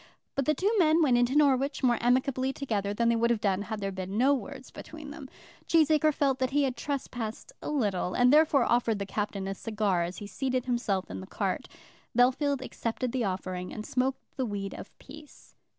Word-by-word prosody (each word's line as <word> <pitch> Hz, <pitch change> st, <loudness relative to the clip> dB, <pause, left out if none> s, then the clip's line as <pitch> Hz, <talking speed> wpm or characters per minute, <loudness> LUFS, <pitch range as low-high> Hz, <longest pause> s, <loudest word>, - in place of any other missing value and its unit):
But 275 Hz, -, -1 dB
the 305 Hz, -, +3 dB
two 400 Hz, +3 st, +1 dB
men 320 Hz, -1 st, +5 dB
went 250 Hz, -5 st, +4 dB
into 245 Hz, +3 st, +2 dB
Norwich 280 Hz, -1 st, +2 dB
more 240 Hz, -2 st, +3 dB
amicably 260 Hz, +2 st, +2 dB
together 215 Hz, -8 st, -2 dB
than 230 Hz, +3 st, +1 dB
they 235 Hz, -, +3 dB
would 230 Hz, +1 st, +2 dB
have 235 Hz, -2 st, +2 dB
done 195 Hz, -2 st, +1 dB
had 215 Hz, 0 st, -5 dB
there 195 Hz, 0 st, -2 dB
been 190 Hz, +1 st, -5 dB
no 265 Hz, +4 st, +4 dB
words 270 Hz, -1 st, -6 dB
between 310 Hz, -2 st, -9 dB
them. 290 Hz, -3 st, -9 dB, 0.4 s
Cheesacre 310 Hz, -1 st, +4 dB
felt 275 Hz, -2 st, +1 dB
that 260 Hz, -1 st, +1 dB
he 290 Hz, +2 st, +2 dB
had 260 Hz, -2 st, 0 dB
trespassed 250 Hz, -6 st, -4 dB
a -, -, -5 dB
little, 205 Hz, -11 st, 0 dB
and 250 Hz, +2 st, +5 dB
therefore 300 Hz, -3 st, +5 dB
offered 235 Hz, -2 st, +2 dB
the 200 Hz, -, -3 dB
Captain 200 Hz, -1 st, -3 dB
a 195 Hz, -, -2 dB
cigar 205 Hz, -3 st, -1 dB
as 175 Hz, +2 st, -3 dB
he 205 Hz, -, -7 dB
seated 255 Hz, +4 st, -2 dB
himself 235 Hz, -, -1 dB
in 95 Hz, -, -5 dB
the 95 Hz, -, -9 dB
cart. -, -, -2 dB, 0.5 s
Bellfield 265 Hz, +2 st, +3 dB
accepted 240 Hz, 0 st, -3 dB
the 250 Hz, -2 st, -1 dB
offering, 185 Hz, -1 st, -4 dB
and 215 Hz, -, -6 dB
smoked 260 Hz, +1 st, -1 dB
the 260 Hz, -, 0 dB
weed 200 Hz, -2 st, -4 dB
of -, -, -9 dB
peace. 295 Hz, +1 st, -14 dB
245 Hz, 205 wpm, -29 LUFS, 205-275 Hz, 0.5 s, men